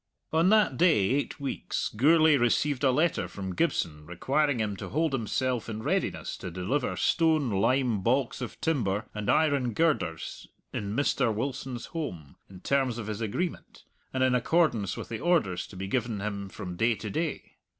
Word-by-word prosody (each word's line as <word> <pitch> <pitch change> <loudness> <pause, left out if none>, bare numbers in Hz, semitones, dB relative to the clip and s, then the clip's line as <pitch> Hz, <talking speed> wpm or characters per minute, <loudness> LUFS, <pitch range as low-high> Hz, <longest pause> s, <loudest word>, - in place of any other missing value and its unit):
On 165 +3 +4
that 210 -11 +4
day 175 -2 +5
eight 140 +2 -1
weeks 140 -1 -3
Gourlay 155 +5 +5
received 135 +2 +1
a 135 - +5
letter 155 +6 +1
from 95 -2 -6
Gibson 75 -3 -1
requiring 135 - 0
him 105 -2 -1
to - - -6
hold 160 0 0
himself 125 0 -1
in 110 0 -5
readiness - - -1
to - - -6
deliver 95 - -1
stone, 160 -7 +2
lime, 120 +2 +2
baulks 125 +5 0
of 125 - -6
timber, 110 -10 0
and 105 -1 -4
iron 140 -6 +2
girders 95 - -1 0.3
in 100 0 -3
Mr. 135 -3 +2
Wilson's 130 +2 -4
holm, 90 - -5
in 95 -1 -12
terms 135 -4 +1
of 115 - -5
his 105 +1 -4
agreement, 130 - -4 0.3
and 130 0 0
in 130 -1 +3
accordance 125 - +1
with - - -6
the 115 -2 -4
orders 155 - +1
to - - -13
be 95 +1 -4
given 115 0 -1
him 100 -1 -4
from 95 -3 -7
day 115 +2 +2
to 105 0 -6
day. 160 +6 -3
125 Hz, 170 wpm, -28 LUFS, 105-145 Hz, 0.3 s, day